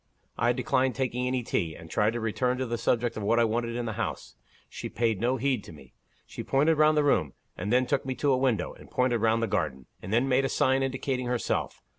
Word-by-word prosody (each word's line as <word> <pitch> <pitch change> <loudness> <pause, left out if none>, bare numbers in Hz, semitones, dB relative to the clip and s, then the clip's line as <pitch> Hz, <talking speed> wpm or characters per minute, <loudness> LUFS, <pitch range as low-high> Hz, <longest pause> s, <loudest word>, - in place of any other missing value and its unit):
I 120 - +2
declined 130 +1 +1
taking 125 -1 -1
any 125 -1 -1
tea, 80 -7 -1
and 80 - -11
tried 105 +6 +1
to 120 - -2
return 125 +3 0
to 130 - -1
the 120 -1 -3
subject 120 0 0
of - - -3
what 110 +3 +2
I - - +5
wanted 115 +1 -1
in 120 0 -2
the 110 - -3
house. - - -5 0.3
She - - -7
paid 115 -4 0
no 125 +2 +1
heed 130 -4 0
to - - -10
me. 70 -5 -15 0.3
She - - -7
pointed 150 +3 +2
round 155 0 +5
the 150 - +4
room; 80 - +2 0.2
and 100 +4 -4
then 125 +1 +4
took 140 +1 0
me 130 -1 -3
to 140 +3 +1
a 130 - +3
window, 130 -5 0
and - - -15
pointed 125 -2 +1
round 115 +1 +2
the - - +1
garden 75 -9 -2 0.2
and 95 - -7
then 120 +4 +2
made 135 0 +3
a 135 - 0
sign 135 -2 +2
indicating 130 -1 -2
herself. 125 -1 -2
120 Hz, 245 wpm, -28 LUFS, 110-130 Hz, 0.3 s, I